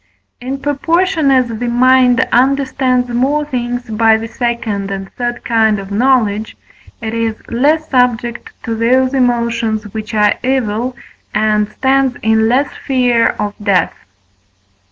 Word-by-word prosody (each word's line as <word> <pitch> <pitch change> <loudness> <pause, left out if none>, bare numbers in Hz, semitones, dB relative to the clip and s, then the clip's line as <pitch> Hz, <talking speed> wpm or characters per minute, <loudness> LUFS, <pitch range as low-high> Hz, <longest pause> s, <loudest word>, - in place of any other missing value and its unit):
In 260 +2 -4
proportion 325 +3 0
as 260 -2 +3
the 235 +1 -4
mind 255 +1 +3
understands 260 -1 +1
more 270 +5 0
things 245 -3 -4
by 220 0 +3
the 225 +1 -6
second 225 -4 -3
and 195 0 -6
third 240 0 -4
kind 220 -2 +2
of 195 0 -8
knowledge, 220 -2 +1 0.4
it 220 -1 -4
is 230 -1 -1
less 300 +6 +1
subject 245 -3 0
to 230 - -3
those 255 +4 +2
emotions 235 -4 0
which 220 0 -5
are 210 -1 +3
evil, 250 -1 -1 0.4
and 215 -1 +1
stands 265 +2 +1
in 220 0 +2
less 270 +4 +1 0.2
fear 245 -3 +2
of 205 -1 -3
death. 200 -3 +1
240 Hz, 135 wpm, -15 LUFS, 220-260 Hz, 0.4 s, as